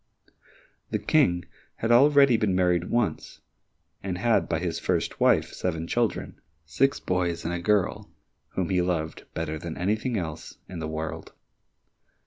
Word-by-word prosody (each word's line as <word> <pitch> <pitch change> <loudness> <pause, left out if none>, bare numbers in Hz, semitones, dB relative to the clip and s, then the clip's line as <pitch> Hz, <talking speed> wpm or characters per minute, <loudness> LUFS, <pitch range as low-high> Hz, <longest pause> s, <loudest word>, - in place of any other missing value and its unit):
The - - 0
King 90 0 +2 0.3
had 115 - -1
already 140 +1 +6
been 105 -4 +1
married 90 -1 +2
once, 120 -2 -1 0.6
and 95 -2 -3
had 100 -4 +2
by 80 - +1
his 85 0 -2
first - - -1
wife, - - +3
seven 80 -3 -2
children, 115 +3 -2 0.2
six 130 - +1
boys 85 -2 -1
and 85 - -1
a 85 - -2
girl, 105 +1 +1 0.5
whom 90 -3 -1
he 90 -1 +3
loved 85 -3 -2
better 80 -1 -3
than 85 0 -6
anything 110 +6 0
else 80 -4 -6
in 90 -2 -7
the 80 - -3
world. 80 0 -5
90 Hz, 145 wpm, -26 LUFS, 85-105 Hz, 0.6 s, already